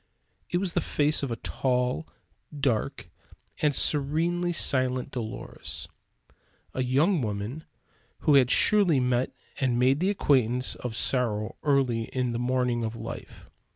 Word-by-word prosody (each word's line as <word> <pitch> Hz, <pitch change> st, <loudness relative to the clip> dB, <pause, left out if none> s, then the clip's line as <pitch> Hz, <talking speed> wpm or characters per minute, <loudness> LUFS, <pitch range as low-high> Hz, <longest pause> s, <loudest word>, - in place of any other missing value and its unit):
It 175 Hz, -, 0 dB
was 180 Hz, -2 st, -2 dB
the -, -, +1 dB
face 150 Hz, +1 st, +2 dB
of 140 Hz, -, -2 dB
a 115 Hz, -, -2 dB
tall, 125 Hz, -, -1 dB, 0.5 s
dark, 135 Hz, -, -1 dB, 0.5 s
and 150 Hz, -2 st, +2 dB
serenely 165 Hz, +6 st, +3 dB
silent 130 Hz, -5 st, +1 dB
Dolores; 110 Hz, -4 st, -6 dB, 0.9 s
a 130 Hz, -, -2 dB
young 145 Hz, +8 st, +2 dB
woman 110 Hz, +7 st, -4 dB, 0.6 s
who 150 Hz, -, +3 dB
had 130 Hz, -3 st, +5 dB
surely 190 Hz, -7 st, +4 dB
met 125 Hz, 0 st, 0 dB, 0.3 s
and 130 Hz, -3 st, +1 dB
made 130 Hz, +3 st, +3 dB
the 185 Hz, +3 st, +1 dB
acquaintance 125 Hz, -, +1 dB
of 120 Hz, -3 st, -6 dB
sorrow 110 Hz, -4 st, 0 dB
early 130 Hz, -6 st, +1 dB
in 125 Hz, 0 st, -2 dB
the 115 Hz, -, -3 dB
morning 125 Hz, -1 st, 0 dB
of 110 Hz, 0 st, -3 dB
life. -, -, -9 dB
130 Hz, 135 wpm, -27 LUFS, 120-150 Hz, 0.9 s, had